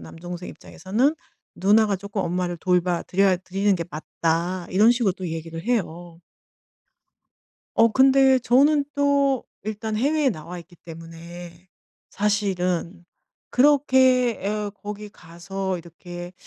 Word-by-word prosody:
남동생 175 Hz, -, -8 dB
입장에서는 220 Hz, -, -1 dB, 0.4 s
"누나가 210 Hz, +2 st, +3 dB
조금 200 Hz, +1 st, -4 dB
엄마를 175 Hz, 0 st, -2 dB
돌봐 180 Hz, -1 st, +1 dB
드려야 190 Hz, 0 st, +2 dB
드리는 195 Hz, +2 st, 0 dB
게 170 Hz, -, -4 dB
맞다." 170 Hz, +3 st, -2 dB
이런 210 Hz, +5 st, +5 dB
식으로 230 Hz, -6 st, +1 dB
또 180 Hz, -2 st, -6 dB
얘기를 165 Hz, 0 st, -6 dB
해요. 175 Hz, -7 st, -3 dB, 1.6 s
어 225 Hz, -, +6 dB
근데 265 Hz, +1 st, +5 dB
저는 280 Hz, +4 st, +3 dB
또 280 Hz, -2 st, +2 dB, 0.2 s
일단 215 Hz, 0 st, -4 dB
해외에 285 Hz, +3 st, +2 dB
나와 175 Hz, -1 st, -7 dB
있기 175 Hz, +1 st, -16 dB
때문에 170 Hz, +2 st, -11 dB, 0.4 s
사실은 185 Hz, -4 st, -1 dB, 0.5 s
그렇게 260 Hz, -3 st, +3 dB
예 210 Hz, 0 st, -2 dB
'거기 210 Hz, +1 st, -8 dB
가서 185 Hz, +2 st, -5 dB
이렇게 175 Hz, +1 st, -10 dB
190 Hz, 255 characters per minute, -23 LUFS, 175-230 Hz, 1.6 s, 어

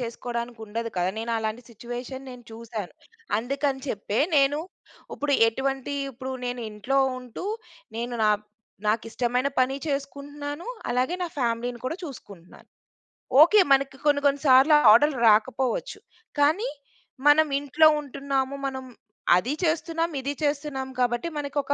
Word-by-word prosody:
చేసుకోడానికి 235 Hz, 0 st, -5 dB
ఉండదు 230 Hz, +2 st, -4 dB
కదా! 180 Hz, +1 st, +1 dB
నేను 225 Hz, +1 st, -3 dB
అలాంటి 220 Hz, +2 st, -3 dB
సిట్యుయేషన్ 245 Hz, +4 st, -7 dB
నేను 250 Hz, -1 st, -11 dB
చూసాను. 225 Hz, -4 st, -7 dB, 0.5 s
అందుకని 275 Hz, +3 st, -1 dB
చెప్పే, 205 Hz, -1 st, -2 dB, 0.2 s
నేను 280 Hz, +1 st, +4 dB, 0.6 s
ఇప్పుడు 290 Hz, 0 st, -1 dB, 0.2 s
ఎటువంటి 270 Hz, +3 st, -2 dB, 0.2 s
ఇప్పుడు 260 Hz, +1 st, -6 dB
నేను 245 Hz, 0 st, -3 dB
ఇంట్లో 210 Hz, +6 st, -1 dB, 0.2 s
ఉంటూ 250 Hz, +6 st, -9 dB, 0.5 s
నేను 240 Hz, +1 st, -3 dB
నా 210 Hz, -, +5 dB, 0.6 s
నాకు 215 Hz, +2 st, +1 dB
ఇష్టమైన 250 Hz, +3 st, 0 dB
పని 255 Hz, +1 st, +2 dB
చేసుకుంటున్నాను. 285 Hz, +2 st, -5 dB, 0.2 s
అలాగే 255 Hz, +7 st, 0 dB
నా -, -, 0 dB
ఫ్యామిలీ‌ని 240 Hz, -1 st, -1 dB
కూడా 290 Hz, +6 st, -2 dB
చూసుకుంటున్నాను. 200 Hz, -, -12 dB, 0.7 s
ఓకే. 380 Hz, +7 st, +7 dB
మనకి 275 Hz, 0 st, +3 dB
కొన్ని 290 Hz, -1 st, +3 dB
కొన్ని 280 Hz, 0 st, +2 dB
సార్లు 265 Hz, +4 st, +7 dB, 0.2 s
ఆర్డరర్లు 270 Hz, +4 st, +4 dB
రాకపోవచ్చు. 225 Hz, +3 st, +1 dB, 0.4 s
కానీ 320 Hz, +12 st, +3 dB, 0.6 s
మనం 310 Hz, +2 st, +6 dB
ఇంట్లో 290 Hz, +3 st, +4 dB
ఉంటున్నాము. 275 Hz, -1 st, -2 dB
మనం 265 Hz, -1 st, -5 dB, 0.5 s
అదీ 220 Hz, +10 st, -1 dB
చేస్తున్నాం, 330 Hz, 0 st, 0 dB
ఇదీ 280 Hz, +2 st, -2 dB
చేస్తున్నాం. 285 Hz, -2 st, -2 dB
కాబట్టి 240 Hz, +3 st, +1 dB
మనకొక 285 Hz, -1 st, -1 dB
265 Hz, 125 wpm, -25 LUFS, 235-285 Hz, 0.7 s, ఓకే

